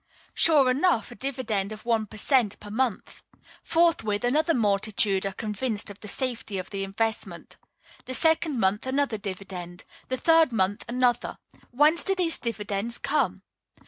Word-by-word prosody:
Sure 285 Hz, -6 st, +5 dB
enough, 275 Hz, -, +1 dB
a -, -, -9 dB
dividend 220 Hz, -5 st, -2 dB
of 215 Hz, +2 st, -8 dB
one 225 Hz, -2 st, +1 dB
per 215 Hz, -, -11 dB
cent. 235 Hz, -2 st, +2 dB
per 205 Hz, -, -10 dB
month! 235 Hz, -1 st, -2 dB, 0.4 s
Forthwith, 290 Hz, -11 st, +1 dB
another 305 Hz, +7 st, +2 dB
multitude 200 Hz, -2 st, +1 dB
are -, -, -3 dB
convinced 210 Hz, +1 st, -3 dB
of 200 Hz, -, -13 dB
the 210 Hz, -, -10 dB
safety 230 Hz, -3 st, -2 dB
of 185 Hz, 0 st, -6 dB
the 195 Hz, -1 st, -3 dB
investment. 220 Hz, +3 st, -3 dB, 0.5 s
The 255 Hz, -, -3 dB
second 320 Hz, -4 st, +2 dB
month 205 Hz, +4 st, +1 dB
another 260 Hz, -4 st, 0 dB
dividend. 185 Hz, -3 st, -7 dB, 0.2 s
The 260 Hz, -, -2 dB
third 325 Hz, +1 st, +4 dB
month 205 Hz, -2 st, 0 dB
another. 245 Hz, 0 st, 0 dB, 0.3 s
Whence 300 Hz, +6 st, +3 dB
do 390 Hz, -, 0 dB
these 345 Hz, -3 st, +1 dB
dividends 215 Hz, 0 st, -3 dB
come? 300 Hz, +2 st, -1 dB
230 Hz, 150 wpm, -26 LUFS, 205-265 Hz, 0.5 s, Sure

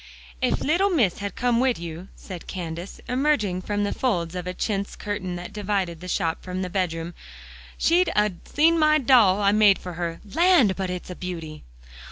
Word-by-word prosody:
"Ef -, -, +1 dB
little 350 Hz, +7 st, +2 dB
Miss 240 Hz, -, +1 dB
had 200 Hz, 0 st, -5 dB
come 245 Hz, -1 st, +1 dB
wid 255 Hz, -1 st, +2 dB
you," 170 Hz, +2 st, -7 dB
said 180 Hz, -3 st, -9 dB
Candace, 170 Hz, 0 st, -6 dB
emerging 250 Hz, -9 st, +1 dB
from 205 Hz, +2 st, -2 dB
the 205 Hz, -, -1 dB
folds 175 Hz, -10 st, -1 dB
of 180 Hz, 0 st, -5 dB
a 180 Hz, -, -3 dB
chintz 200 Hz, -1 st, -2 dB
curtain 200 Hz, -3 st, -4 dB
that 175 Hz, 0 st, -8 dB
divided 195 Hz, -5 st, -2 dB
the 180 Hz, -, -8 dB
shop 165 Hz, -2 st, -1 dB
from 185 Hz, 0 st, -4 dB
the 180 Hz, -, -5 dB
bedroom, 170 Hz, -3 st, -2 dB, 0.6 s
"she'd 350 Hz, +2 st, +3 dB
'a' 210 Hz, 0 st, +3 dB
seen 330 Hz, +3 st, +3 dB
my 305 Hz, 0 st, +5 dB
doll 230 Hz, -8 st, +5 dB
I 200 Hz, -, +5 dB
made 205 Hz, -2 st, +5 dB
for 180 Hz, -, -8 dB
her. 170 Hz, -1 st, -4 dB
Land! 335 Hz, -, +4 dB
but 190 Hz, -1 st, -3 dB
it's 180 Hz, 0 st, -5 dB
a -, -, -6 dB
beauty." 165 Hz, -4 st, -6 dB
195 Hz, 190 wpm, -24 LUFS, 180-240 Hz, 0.6 s, my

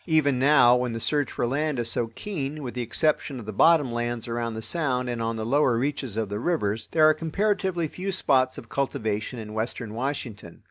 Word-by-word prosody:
Even 145 Hz, -5 st, +3 dB
now, 130 Hz, -3 st, +6 dB
when 125 Hz, -1 st, -1 dB
the 115 Hz, -, -3 dB
search 145 Hz, +3 st, 0 dB
for -, -, -1 dB
land 145 Hz, +3 st, -1 dB
is 115 Hz, -1 st, -1 dB
so 115 Hz, -, -1 dB
keen, 155 Hz, -7 st, -4 dB
with 125 Hz, -, -5 dB
the 125 Hz, -, -3 dB
exception 135 Hz, +3 st, 0 dB
of 115 Hz, -, -9 dB
the 110 Hz, -, -6 dB
bottom 145 Hz, +3 st, +4 dB
lands 120 Hz, 0 st, -3 dB
around 115 Hz, -1 st, -3 dB
the 110 Hz, -, -5 dB
Sound 130 Hz, -6 st, -1 dB
and 120 Hz, -1 st, -3 dB
on 115 Hz, 0 st, -1 dB
the 110 Hz, -1 st, -4 dB
lower 130 Hz, -1 st, +3 dB
reaches 130 Hz, -3 st, -2 dB
of 110 Hz, -1 st, 0 dB
the 105 Hz, +1 st, -4 dB
rivers, 115 Hz, -8 st, -1 dB
there 155 Hz, -1 st, +5 dB
are 155 Hz, -, +6 dB
comparatively 185 Hz, +1 st, -1 dB
few 185 Hz, +5 st, -4 dB
spots 130 Hz, -8 st, +2 dB
of 115 Hz, -, -9 dB
cultivation 110 Hz, -4 st, -2 dB
in 105 Hz, -2 st, -7 dB
western 110 Hz, 0 st, -4 dB
Washington. 115 Hz, -7 st, -5 dB
125 Hz, 215 wpm, -26 LUFS, 115-150 Hz, -, now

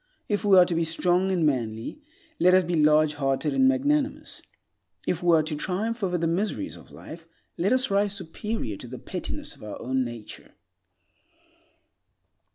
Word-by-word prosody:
If 205 Hz, -1 st, -1 dB
we 200 Hz, -2 st, +6 dB
are 180 Hz, -, +8 dB
to 175 Hz, -, -2 dB
be 165 Hz, 0 st, +1 dB
strong 180 Hz, +3 st, +1 dB
and 175 Hz, -4 st, +1 dB
manly, 120 Hz, -, -2 dB, 0.4 s
let 180 Hz, +1 st, +5 dB
us 185 Hz, -, +5 dB
be 175 Hz, +1 st, -3 dB
large 155 Hz, 0 st, +4 dB
hearted 140 Hz, +1 st, -1 dB
and 265 Hz, 0 st, +4 dB
magnanimous. 280 Hz, +2 st, 0 dB, 0.6 s
If 175 Hz, -, -1 dB
we 175 Hz, -1 st, +4 dB
are 155 Hz, -, +2 dB
to 155 Hz, 0 st, -3 dB
triumph 210 Hz, +9 st, -2 dB
over 180 Hz, -2 st, 0 dB
the 170 Hz, -, -1 dB
miseries 200 Hz, -, -1 dB
of -, -, -15 dB
life, 165 Hz, +1 st, -11 dB, 0.3 s
let 185 Hz, +6 st, 0 dB
us 255 Hz, -2 st, +2 dB
rise 200 Hz, 0 st, +1 dB
superior 170 Hz, -, -4 dB
to -, -, -10 dB
the -, -, -8 dB
pettiness -, -, -6 dB
of -, -, -20 dB
our 115 Hz, +4 st, -6 dB
nature. 120 Hz, -4 st, -4 dB
175 Hz, 165 wpm, -26 LUFS, 150-205 Hz, 0.6 s, are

